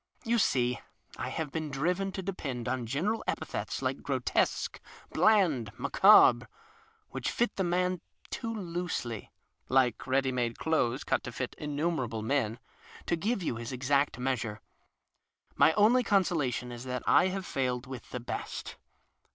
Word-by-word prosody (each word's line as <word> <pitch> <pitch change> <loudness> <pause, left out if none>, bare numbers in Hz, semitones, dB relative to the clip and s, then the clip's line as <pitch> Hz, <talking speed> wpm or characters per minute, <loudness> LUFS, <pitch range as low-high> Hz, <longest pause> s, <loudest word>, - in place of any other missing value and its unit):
You 235 +1 +2
see, 125 - +2 0.4
I - - -3
have 160 -3 -3
been 155 0 -3
driven 180 +8 0
to 190 - -4
dcjiend 135 -11 -4
on 125 -1 -2
general 185 - -1
epithets - - -3
like - - -1
grotesque, - - 0 0.3
bland, 165 - +3
macabre, - - +6 0.7
whicli - - -3
fit 240 - 0
the 190 - 0
man 180 0 0 0.3
too 230 -2 -3
loosely 175 - -4 0.4
(like 130 -3 +2
ready 130 0 +2
made 120 -2 -1
elothes 135 -5 0
eut - - +1
to 125 - -7
fit 125 +1 -4
innumer 150 0 -1
able 110 -1 -5
men) 115 -3 0 0.5
to 170 - +1
give 200 +4 -1
you 120 - -2
his 120 +1 -6
exaet 135 +1 +1
measure. 125 -4 -2 1.0
My - - +6
only 220 +6 +5
consolation 165 - +1
is 120 0 -7
that 125 -1 -3
I 180 - +5
have 190 0 -3
failed 125 -1 -1
with 130 -2 -9
the 125 - -4
best. 120 - -5
140 Hz, 150 wpm, -30 LUFS, 125-180 Hz, 1.0 s, macabre